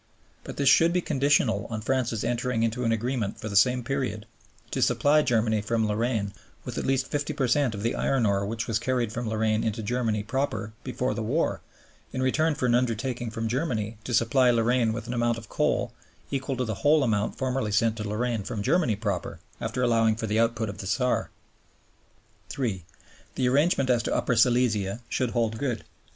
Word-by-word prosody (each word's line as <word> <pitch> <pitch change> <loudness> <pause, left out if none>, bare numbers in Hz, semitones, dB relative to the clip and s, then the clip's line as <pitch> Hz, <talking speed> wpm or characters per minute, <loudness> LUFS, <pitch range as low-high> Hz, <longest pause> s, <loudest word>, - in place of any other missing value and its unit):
But - - -8
this 140 - +1
should 165 +5 +6
be 180 - +2
conditional 140 - +1
on 110 -2 -4
France's 120 -2 -1
entering 120 0 0
into 115 +2 -1
an 115 - +1
agreement 115 -2 -2
for 110 - -5
the 100 - -5
same 125 +5 +4
period 125 -5 -2 0.5
to - - -2
supply 150 +1 +4
Germany 110 -5 +1
from 110 +1 0
Lorraine 105 -1 -1 0.3
with - - -4
at - - -3
least 135 0 +1
50 145 +2 -2
per 135 -3 0
cent 125 -2 +2
of 100 - -6
the 115 - +1
iron 135 -4 +1
ore 100 -1 +1
which 110 +3 -3
was 110 -2 0
carried 120 -2 -1
from 120 -1 -3
Lorraine 110 0 +1
into 110 0 -2
Germany 110 -2 -1
proper 115 -2 -2
before 125 0 -2
the - - -4
war, 130 +10 0 0.5
in - - -4
return 155 +4 +2
for 135 - -2
an 120 - +3
undertaking 120 0 0
from 115 0 -3
Germany 115 -5 -2
to 125 - -6
supply 120 +2 +3
Lorraine 120 0 +2
with 115 0 -5
an 120 - -4
amount 120 -1 +1
of 115 -2 -10
coal - - 0 0.4
equal 135 -1 -2
to 125 - 0
the 110 -4 -4
whole 150 0 +4
amount 105 -4 0
formerly 130 -4 -1
sent 110 +2 +2
to 105 - -4
Lorraine 115 +1 -1
from 100 +1 -4
Germany 155 - +2
proper, 100 -4 -3 0.2
after 120 +3 -2
allowing 115 -2 +3
for 110 +1 -4
the 110 +1 0
output 115 -1 +1
of 100 - -7
the 95 - -5
Saar. 125 +5 0 1.2
(3) 105 -10 -3 0.5
The 130 - +1
arrangement 140 0 +3
as 120 -2 +3
to - - -1
Upper 125 - +1
Silesia 115 -3 +2
should 125 -2 0
hold 115 -2 -1
good. 125 -5 -2
115 Hz, 195 wpm, -26 LUFS, 110-130 Hz, 1.2 s, should